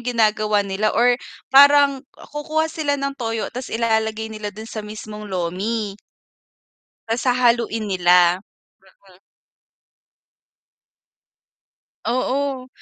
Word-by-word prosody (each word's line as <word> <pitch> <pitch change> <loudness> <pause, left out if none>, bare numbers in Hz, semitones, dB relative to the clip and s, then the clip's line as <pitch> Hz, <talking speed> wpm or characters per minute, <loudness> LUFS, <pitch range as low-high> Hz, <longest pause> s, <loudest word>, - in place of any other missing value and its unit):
ginagawa 215 -3 +1
nila, 200 +2 0
or 245 +1 +5 0.4
parang 280 0 +7 0.3
kukuha 310 +2 -1
sila 310 -3 -1
ng 275 0 -2
toyo 225 -2 -3
ta's 255 +1 -6
ilalagay 220 -1 -1
nila 215 -1 -5
dun 215 +2 -9
sa 225 -1 -6
mismong 210 0 -8
lomi. 195 +4 -3 1.1
Ta's 225 +1 -1
hahaluin 235 -3 +2
nila. 180 -1 +4 0.4
Mm. 190 -1 -23 2.9
Oo, 260 +1 -1
220 Hz, 95 wpm, -21 LUFS, 210-255 Hz, 2.9 s, parang